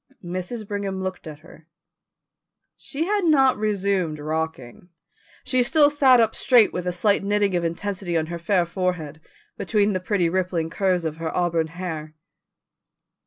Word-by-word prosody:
Mrs. 185 +5 -5
Brigham 200 -2 -3
looked 185 -3 -5
at 150 -1 -9
her. 160 -1 -17 1.1
She 305 +3 -4
had 410 +1 0
not 275 -6 +4
resumed 200 -6 -1
rocking. 155 -1 -5 0.5
She 255 -1 +2
still 290 +4 +4
sat 270 -4 +5
up 225 -1 +2
straight 240 -5 +4
with 180 0 -4
a - - +1
slight 200 +3 +1
knitting 205 -1 +1
of 175 - 0
intensity 175 +1 -3
on 160 - 0
her 170 +1 -6
fair 180 0 +1
forehead, 170 -4 -3 0.4
between 210 -1 +1
the 185 - -1
pretty 185 -1 0
rippling 175 -2 -1
curves 185 -3 0
of 160 -1 -3
her 165 0 -3
auburn 170 -2 +1
hair. 160 -2 -6
185 Hz, 155 wpm, -23 LUFS, 165-210 Hz, 1.1 s, sat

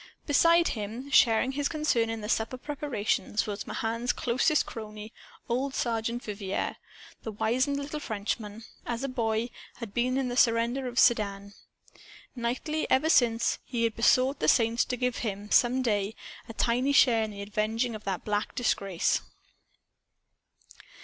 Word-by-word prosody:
Beside 335 +3 +4
him, 230 +6 -5
sharing 245 0 +4
his 285 +1 -1
concern 300 -8 +1
in 225 -1 -4
the 210 - -5
supper 225 +3 -1
preparations, 265 -7 -2
was 205 -1 -5
Mahan's 230 +2 -1
closest 255 +6 +1
crony, 215 -1 -8 0.3
old 260 +3 -1
Sergeant 235 0 -2
Vivier. 200 -2 -3 0.4
The 220 - -5
wizened 255 +7 0
little 285 +2 -4
Frenchman, 215 -2 -4 0.2
as 240 +2 -4
a - - 0
boy, 230 -2 -1 0.2
had 230 -5 -8
been 250 +2 +1
in 270 -1 0
the 245 - -3
surrender 235 +2 +2
of 245 -1 -7
Sedan. 200 -5 +2 0.8
Nightly, 255 +6 -2
ever 305 +5 +3
since, 235 -4 +3
he 235 -2 -2
had 230 -1 0
besought 255 +4 +3
the 155 - 0
saints 230 +6 +3
to 250 - -3
give 250 -1 -1
him, 205 -2 -4
some 255 +2 +4
day, 210 -2 0 0.3
a - - -6
tiny 250 +5 +1
share 240 -5 +5
in 220 - -2
the 200 -1 -7
avenging 220 +4 -1
of 215 -1 -8
that 195 -2 -3
black 210 0 -2
disgrace. 195 -7 0
235 Hz, 150 wpm, -28 LUFS, 215-255 Hz, 0.8 s, share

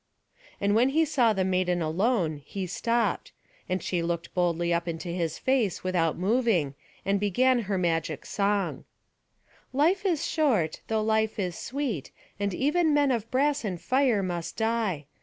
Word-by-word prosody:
And 200 0 +1
when 240 +5 +4
he 320 +4 +3
saw 255 -7 +3
the 190 -3 0
maiden 180 -1 +1
alone, 165 - 0
he 195 +5 -5
stopped; 230 +2 -1 0.4
and 185 +1 -1
she 175 -2 -1
looked 170 0 -3
boldly 175 -1 +1
up 170 0 -1
into 170 +1 -4
his 170 -2 -2
face 255 -8 0
without 175 -4 +1
moving, 195 - +1 0.3
and 200 0 +1
began 245 +6 +3
her 195 - +1
magic 165 -4 -1
song: 200 -1 -1 0.9
"Life 330 +9 +2
is 340 -6 0
short, 235 - +1
though 220 -1 0
life 220 0 +1
is 180 -4 -2
sweet; 255 - -3 0.3
and 200 0 0
even 300 - +2
men 285 -2 +3
of 230 -2 -2
brass 285 +2 +1
and 185 -5 -3
fire 250 +1 +2
must 175 -2 -4
die. 220 -9 0
200 Hz, 160 wpm, -27 LUFS, 175-255 Hz, 0.9 s, when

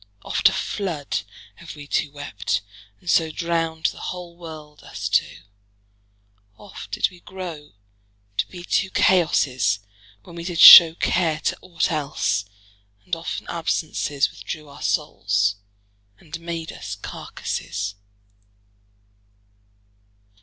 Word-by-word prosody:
Oft - - +3
a - - -4
flood 165 - -3 0.4
Have 170 -1 -10
wee 145 -1 -10
two 145 0 -1
wept, 110 -10 -3 0.4
and - - -22
so 165 -1 +3
Drownd 165 0 -2
the - - -13
whole 180 -1 -8
world, 155 -3 -11
us - - -5
two; 80 - 0 1.1
oft 100 - -11
did 105 - 0
we 180 - -16
grow 175 -6 -8 0.6
To - - +1
be 180 -2 -10
two 195 +2 0
Chaosses, 130 - +2 0.5
when 170 - -13
we 170 - -6
did 175 -1 -4
show 165 0 +12
Care 165 -3 +1
to - - -1
ought 175 0 -1
else; 140 -9 -1 0.6
and 180 - -1
often 165 0 -5
absences 155 -3 -1
Withdrew 155 -2 -8
our 140 - -13
soules, 100 -8 0 0.6
and 155 +7 -9
made 165 -1 -5
us - - -7
carcasses. 100 +3 -5
160 Hz, 120 wpm, -23 LUFS, 145-170 Hz, 1.1 s, show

